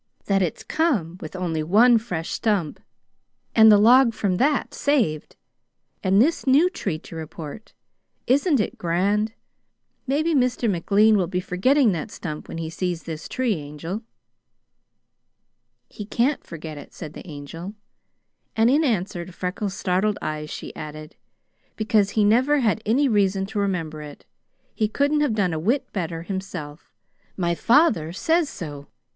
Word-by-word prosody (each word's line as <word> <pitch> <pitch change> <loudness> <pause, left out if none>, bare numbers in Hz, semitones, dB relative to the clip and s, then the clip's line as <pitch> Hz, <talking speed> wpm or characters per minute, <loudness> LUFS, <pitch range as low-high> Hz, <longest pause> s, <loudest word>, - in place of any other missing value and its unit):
That 195 -1 +2
it's 175 -4 -2
come 210 - 0
with 155 - -8
only 170 -4 -2
one 225 +9 +5
fresh 180 -8 -5
stump, 200 -9 -1 0.8
and 220 -1 +8
the 210 - +8
log 235 +2 +6
from 190 -4 0
that 285 +5 +1
saved, 235 - 0 0.7
and 190 +1 +3
this 290 +4 +2
new 300 +8 +5
tree 195 - -3
to 165 - -12
report, 160 +5 -8 0.5
isn't 280 +3 +3
it 210 - -2
grand? 200 +6 0 0.7
Maybe 310 +5 +1
Mr. 250 -3 +1
McLean 205 +3 +3
will 185 -3 +1
be 180 +1 -2
forgetting 225 +8 +2
that 170 +3 -4
stump 155 -6 -7
when - - -7
he 165 -1 -4
sees 175 +1 -3
this 160 -1 -7
tree, 255 -4 0
Angel!" 160 +5 -6 1.9
"He 210 - -8
can't 255 +7 0
forget 155 -2 -8
it," 145 - -13
said 155 -3 -8
the - - -11
Angel; 165 +6 -8 0.8
and 225 +2 +4
in 300 +4 +3
answer 195 - -1
to 185 - -11
Freckles' 185 +2 -4
startled 190 +3 0
eyes 155 0 -4
she - - -7
added, 155 0 -8 0.6
"because 215 -2 +2
he 215 - +5
never 260 +7 +3
had 220 -2 +1
any 270 +6 +3
reason 195 -4 +1
to 210 +1 -4
remember 165 -6 -2
it. 150 -1 -11 0.5
He 215 - 0
couldn't 285 +6 +1
have 275 -7 +1
done 190 -5 +1
a 160 - -2
whit 235 - -1
better 165 -4 -3
himself. 175 -6 -7 0.5
My 170 -2 0
father 220 - +3
says 320 - +1
so. 145 -5 -8
195 Hz, 150 wpm, -23 LUFS, 165-235 Hz, 1.9 s, and